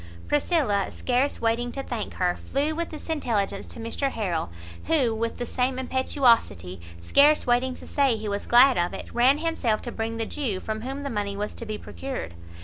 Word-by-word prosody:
Priscilla, 285 - +1
scarce 255 +3 0
waiting 235 +1 0
to 275 +2 -5
thank 235 -5 -4
her, 180 -1 +1
flew 290 +3 -1
with 335 +1 -3
this 310 - -9
intelligence 215 -11 -1
to - - -9
Mr 230 +5 -2
Harrel; 180 - -2 0.4
who 275 -8 +2
with 230 +1 -2
the 245 - -3
same 255 +2 -1
impetuosity, 235 - +1 0.2
scarce 285 - +4
waiting 250 +1 +2
to - - -12
say 275 -4 +2
he 215 0 -5
was 200 0 -3
glad 250 0 +6
of 175 0 0
it, - - -8
ran 250 +4 +5
himself 300 -9 0
to 240 - -5
bring 225 0 -3
the 225 - -1
Jew 225 -7 -2
from 220 +2 -4
whom 270 +4 -5
the 280 - -3
money 205 -2 -2
was 210 +1 -3
to 230 - -8
be 215 0 -3
procured. 265 - -6
240 Hz, 195 wpm, -26 LUFS, 215-275 Hz, 0.4 s, glad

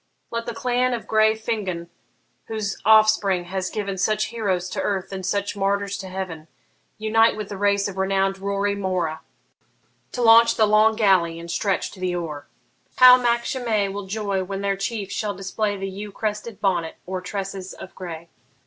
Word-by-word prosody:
Let 230 0 -3
the 235 - -4
clan 250 +1 +1
of 230 - -7
grey 220 0 +3
Fingon, 205 -6 -3 0.6
whose 215 -3 -4
offspring 215 -4 +5
has 185 +1 -3
given 200 -3 -4
Such 215 +2 +1
heroes 190 -6 -1
to - - -3
earth 195 -2 -2
and 190 -1 -5
such 200 +2 -1
martyrs 200 0 0
to 190 - -7
heaven, 180 -4 -6 0.5
Unite 225 +1 +3
with 210 -2 -5
the 200 - -6
race 200 0 +2
of 195 -1 -7
renown'd 195 0 +1
Rorri 200 +1 -1
More, 185 -5 -2 0.9
To 245 - -3
launch 230 0 +7
the 220 - +4
long 215 +1 +4
galley 185 -6 +3
and 170 0 -7
stretch 195 0 -1
to 190 - -13
the 180 -1 -1
oar. 155 -5 -5 0.5
How 255 0 +9
Mac 235 -1 +1
Shimei 225 -7 0
will 200 0 -6
joy 200 -2 -2
when 195 +1 -5
their 200 0 0
chief 200 0 -4
shall 205 -1 -2
display 200 +2 -2
The 195 0 -4
yew 200 +2 -7
crested 210 +1 -4
bonnet 175 -5 0
o'er 185 0 -3
tresses 190 0 -5
of 190 - -11
grey! 170 -2 -8
200 Hz, 175 wpm, -23 LUFS, 190-215 Hz, 0.9 s, How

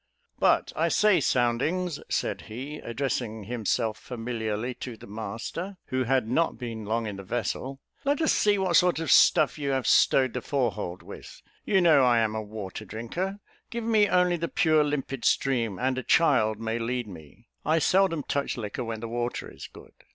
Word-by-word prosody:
"But, - - +2
I 165 - +1
say, 200 +1 +4
Soundings," 140 +7 0
said - - -1
he, 135 +7 -6
addressing 115 -3 -3
himself 110 0 -1
familiarly 115 -1 -4
to 120 -3 -6
the - - -12
master, 115 - -6
who 130 0 0
had 130 -2 +1
not 160 +6 +1
been 115 -3 -6
long 115 +2 -1
in 105 -2 -5
the 100 - -8
vessel, 120 +5 -3 0.2
"let 285 +1 +1
us 315 - +3
see 205 -1 +3
what 185 -3 +1
sort 180 0 +3
of 165 0 -1
stuff - - +5
you 140 -1 -2
have 130 -3 0
stowed 130 +2 +4
the 125 - -3
fore 130 -4 0
hold 90 -3 -6
with. - - -11 0.2
You 195 -3 +3
know 155 -6 +5
I 120 -2 +4
am 110 -2 +1
a 110 - -2
water 105 -1 -7
drinker; 170 - -5 0.3
give 235 -1 -4
me 220 -2 +3
only 180 -1 +3
the 170 0 -2
pure 155 -2 +3
limpid 135 -3 -3
stream, 115 -7 +1
and 130 0 0
a - - -3
child 120 -8 +3
may 115 +1 -2
lead 120 +1 -2
me. 90 +5 -13
I 160 +1 +2
seldom 175 -2 +2
touch 140 -1 -2
liquor 115 +2 -4
when 115 -1 -5
the 115 - -4
water 120 +1 -3
is - - -9
good." - - -15
125 Hz, 190 wpm, -27 LUFS, 110-160 Hz, 0.3 s, stuff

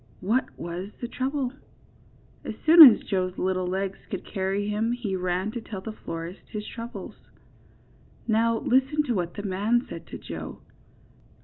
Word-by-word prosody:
What 230 +8 +1
was 175 +3 -5
the 240 - -4
trouble? 260 +1 -2 0.9
As - - -5
soon 330 +1 +9
as 225 - 0
Joe's 185 -2 -1
little 185 -1 0
legs 195 +1 -2
could - - -5
carry 195 0 -2
him 215 +3 0
he 230 -6 -3
ran 185 +2 -1
to 235 - -5
tell 215 -3 -7
the 220 - -6
florist 165 -3 -7
his 210 -1 -5
troubles. 230 +2 -9 1.0
Now 230 +1 +2
listen 270 +6 +2
to 255 -5 -1
what 175 -4 -2
the 205 - -5
man 210 +5 +1
said - - -9
to - - -7
Joe. - - -8
210 Hz, 155 wpm, -26 LUFS, 185-240 Hz, 1.0 s, soon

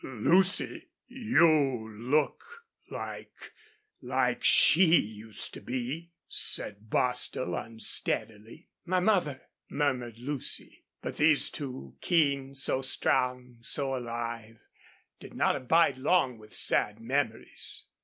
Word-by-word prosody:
"Lucy 175 - +1 0.2
you 160 - +2 0.2
look 155 - -1 0.3
like - - -8 0.5
like - - -1
she 170 0 +6
used 110 0 -5
to - - -9
be," 130 +7 -4 0.2
said 105 +1 0
Bostil, 125 +2 -1
unsteadily. 110 - -4 0.2
"My 185 0 0
mother!" 180 -9 +1 0.3
murmured 125 -6 -2
Lucy. 135 +3 -3 0.2
But - - -5
these 150 -1 +4
two, 125 - -7
so - - -33
keen, 140 -5 +1
so 130 0 +3
strong, 125 -1 0
so 135 +2 -1
alive, 115 -2 -5 0.6
did - - -12
not - - +2
abide 140 0 +2
long 130 -5 +1
with 110 0 -13
sad 105 +1 0
memories. 115 -1 -2
130 Hz, 105 wpm, -29 LUFS, 115-155 Hz, 0.6 s, she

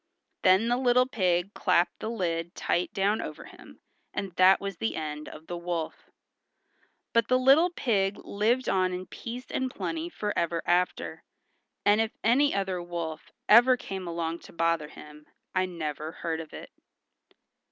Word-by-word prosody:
Then 190 +4 +5
the 240 +1 +2
little 250 0 +4
pig 185 -5 0
clapped 180 -2 +1
the 220 - -4
lid 170 -6 -2
tight 175 - 0
down 200 +2 +1
over - - -7
him, - - -15 0.3
and 195 -2 -3
that 185 +2 +5
was 195 -2 -5
the 110 -5 -2
end 150 -1 -5
of 155 - -12
the 175 - -5
wolf. 170 -2 -4 1.0
But 230 -1 +3
the 255 - +4
little 275 +7 +5
pig 205 - 0
lived 230 +5 0
on 185 -1 +2
in 180 +1 -4
peace 245 +5 -7
and 260 0 -1
plenty 325 +5 -4
forever 170 - -2
after, 180 +1 0 0.6
and 205 +2 +5
if 225 0 -3
any 270 +6 +4
other 190 -2 -1
wolf 170 -3 -5 0.2
ever 245 +4 +7
came 190 -5 -6
along 170 0 -3
to - - -15
bother 165 -2 +1
him 150 0 -13 0.3
I 185 0 +1
never 155 -3 -4
heard 165 -1 -3
of 160 -1 -8
it. - - -10
185 Hz, 160 wpm, -28 LUFS, 170-230 Hz, 1.0 s, ever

